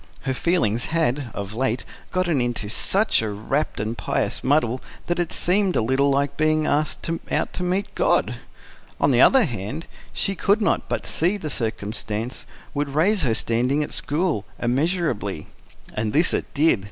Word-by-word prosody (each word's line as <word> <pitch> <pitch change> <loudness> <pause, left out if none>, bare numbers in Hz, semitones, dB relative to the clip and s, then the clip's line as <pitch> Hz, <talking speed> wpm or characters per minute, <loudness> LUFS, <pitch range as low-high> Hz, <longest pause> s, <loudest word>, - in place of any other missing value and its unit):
Her 135 - -1
feelings 125 - +1
had, 145 -5 0
of 100 0 -5
late, 125 0 -1 0.3
got 185 -1 +1
into 120 -9 0
such 195 - +2
a 110 - -2
rapt 110 +9 -2
and 110 +2 -2
pious 90 -8 -1
muddle 130 -3 +2 0.2
that 175 0 -1
it 175 -2 -1
seemed 190 +1 +1
a - - +3
little 130 +4 +2
like 140 0 +1
being 155 0 +2
asked 150 +1 0 0.2
out - - 0
to - - -4
meet 185 +3 -1
God. - - +2 0.6
On - - +3
the - - +4
other 265 -2 +7
hand, 120 - -5 0.3
she 195 - -1
could 200 +3 +2
not 210 - 0
but - - -2
see 175 +5 +1
that 200 - -15
the 155 - -2
circumstance 110 0 -3 0.3
would 145 -1 -2
raise 190 +6 +3
her 120 -7 +2
standing 125 +7 +1
at - - -6
school, 150 - 0
immeasurably. 125 - 0 0.5
And 110 0 -2
this 160 +4 +4
it - - -2
did. 150 -5 +4
140 Hz, 170 wpm, -23 LUFS, 115-170 Hz, 0.6 s, other